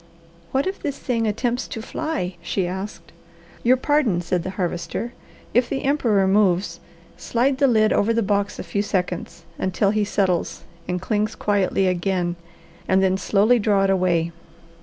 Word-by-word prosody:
"What 270 +1 +1
if 380 +1 -3
this 285 -2 -3
thing 230 -4 -1
attempts 240 +3 -1
to 225 - -6
fly?" 195 - -3
she 185 +1 -1
asked. 190 +4 -6 0.5
"Your 255 +2 +4
pardon," 265 -9 +2
said 175 0 -1
the 185 - -5
Harvester. 180 +6 -3 0.4
"If 245 0 +3
the 270 - -2
emperor 235 -9 +2
moves, 195 -1 +2 0.4
slide 260 +3 0
the 280 - +5
lid 220 -3 +3
over 210 +3 +2
the 230 0 +1
box 200 0 0
a - - -5
few 185 +3 -1
seconds, 180 -4 -3 0.2
until 190 +2 +1
he 215 0 +1
settles 190 -4 0 0.2
and 180 0 -1
clings 210 +3 -1
quietly 195 -2 +1
again, 180 -1 0 0.5
and 190 +1 +3
then 190 0 +3
slowly 210 +5 +3
draw 205 -2 +2
it 195 - +3
away. 175 -3 +1
200 Hz, 160 wpm, -22 LUFS, 185-230 Hz, 0.5 s, the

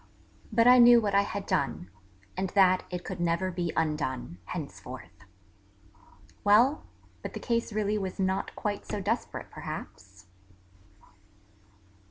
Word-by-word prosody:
But 230 +1 +3
I 250 +1 +8
knew 240 0 +8
what 205 -3 -1
I 200 - +5
had 200 0 -4
done, 90 - -2 0.4
and 190 0 -2
that 185 -2 +4
it 180 -1 -5
could 185 -2 -6
never 175 +2 0
be 175 -2 -2
undone, 150 - -2
henceforth... 85 +3 -8 1.2
Well, 235 +8 +4 0.3
but - - -6
the - - -5
case 235 -1 -1
really 210 0 0
was 190 -1 -5
not 190 0 -1
quite 205 -1 -3
so 210 - -3
desperate 190 - -3
perhaps? - - -9
190 Hz, 130 wpm, -28 LUFS, 170-210 Hz, 1.2 s, I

